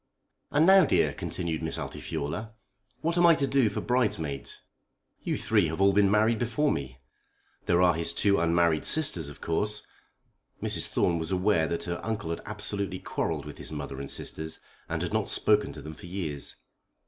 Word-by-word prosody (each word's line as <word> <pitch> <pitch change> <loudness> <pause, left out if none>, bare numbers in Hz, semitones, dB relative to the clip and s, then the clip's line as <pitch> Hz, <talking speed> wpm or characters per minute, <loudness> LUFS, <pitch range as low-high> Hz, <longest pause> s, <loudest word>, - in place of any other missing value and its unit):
"And 150 +2 +3
now, 190 +1 +8
dear;" - - +2
continued 85 -3 -3
Miss 80 0 -2
Altifiorla, 105 +10 -5 0.5
"what 170 +2 0
am 175 - +6
I 165 - +7
to 140 - +1
do 135 -4 +2
for - - -4
bridesmaids? 105 - -1 0.6
You - - -2
three 105 -6 +2
have 80 +2 -4
all 100 0 +4
been 100 0 +4
married 110 +2 +3
before 130 +5 +1
me. 65 -2 -4 0.7
There 90 +1 +4
are 90 -1 +5
his 85 +1 0
two 100 +2 +3
unmarried 85 -1 +2
sisters 90 - +2
of 75 - -13
course." 105 +6 -1 0.7
Mrs. - - +2
Thorne 85 -2 +1
was 80 0 -3
aware 95 -3 +2
that 85 - -2
her 85 0 -4
uncle 110 -7 -3
had 85 - -4
absolutely 100 -2 -1
quarrelled - - -3
with - - -9
his - - -7
mother 70 -3 -6
and 70 - -6
sisters, 80 0 -5 0.3
and - - -2
had - - -4
not - - 0
spoken 105 -1 +2
to - - -10
them 80 - -7
for 90 - -12
years. 85 -6 -2
95 Hz, 185 wpm, -28 LUFS, 80-110 Hz, 0.7 s, now